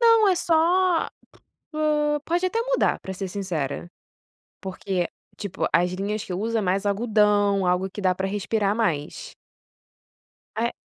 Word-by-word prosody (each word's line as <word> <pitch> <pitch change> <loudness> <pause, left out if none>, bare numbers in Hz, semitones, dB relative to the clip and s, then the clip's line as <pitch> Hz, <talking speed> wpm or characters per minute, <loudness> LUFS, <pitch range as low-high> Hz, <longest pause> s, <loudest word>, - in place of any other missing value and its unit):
Não 455 -3 +6
é 375 - +4
só, 345 +1 +3 0.6
po 300 -1 +1
pode 350 +2 +1
até 450 +5 0
mudar - - +1
para 190 - -6
ser 190 +1 -4
sincera, 175 -6 -3 0.7
porque, 190 -2 -2 0.3
tipo, 200 -3 -2
as 180 +1 +3
linhas 200 +3 -3
que 185 - -6
usa 225 +4 -1
mais 195 +1 0
algodão, 205 -2 +2
algo 180 +2 +1
que 205 +2 -7
dá 185 -1 +2
para 190 +1 -2
respirar 205 +1 0
mais. 190 - -2 1.2
É, 235 +2 0
205 Hz, 140 wpm, -24 LUFS, 190-305 Hz, 1.2 s, Não